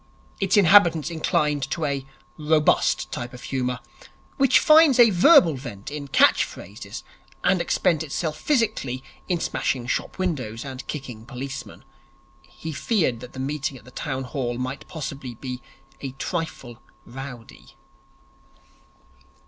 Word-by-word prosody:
Its 195 0 +2
inhabitants 175 -4 +5
incline 150 -2 +1
to 140 +4 -2
a 140 -2 -2 0.3
robust 155 0 +2
type 120 0 -5
of 125 - -11
humour, 125 -2 -2 0.6
which 270 -2 +5
finds 310 -4 +6
a 235 -3 +7
verbal 195 - +6
vent 125 -4 -8
in 145 -1 -5
catch 135 - +5
phrases 100 +1 -9 0.4
and - - +3
expends 165 -3 +1
itself 155 +1 -3
physically 210 - 0 0.3
in 175 -2 +1
smashing 125 -6 -1
shop - - -2
windows 130 - -3
and 130 -1 -7
kicking 125 -7 -6
policemen. 135 +2 -7 0.6
He 160 0 -8
feared 155 - 0
that 125 0 -11
the 130 - -8
meeting 140 0 -3
at - - -17
the 125 - -14
Town 135 0 -4
Hall 125 -3 -3
might 130 +2 -5
possibly 135 -6 -6
be 125 +1 -6 0.4
a 135 -2 -6
trifle 135 -5 -5 0.2
rowdy. 125 -2 -10
140 Hz, 130 wpm, -24 LUFS, 125-165 Hz, 0.6 s, a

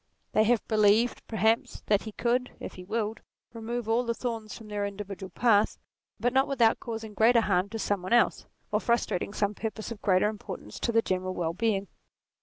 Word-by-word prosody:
They 215 - +4
have 235 -1 +2
believed, 215 +2 +3
perhaps, 220 +1 +1
that 205 -1 +3
he 220 - -5
could, 245 +3 0
if - - -7
he 185 - -10
willed, 220 +2 -2 0.3
remove 230 0 -4
all 230 +2 +2
the 235 -1 -1
thorns 225 -4 -4
from 225 - -12
their 205 -1 -2
individual 200 -1 -5
path, 220 -2 +3 0.4
but 245 +1 +1
not 265 +1 +4
without 240 -5 +3
causing 225 -2 -6
greater 230 +3 +5
harm 195 -2 +1
to 225 - -5
some 205 -3 -1
one 185 - -6
else, 240 - +3 0.2
or - - +2
frustrating 235 -5 0
some 205 0 0
purpose 220 +1 -5
of 225 - -7
greater 185 0 +3
importance 210 -1 -7
to 235 - 0
the 230 0 +3
general 185 0 -2
well 165 -1 -1
being. 200 0 0
220 Hz, 195 wpm, -28 LUFS, 200-230 Hz, 0.4 s, greater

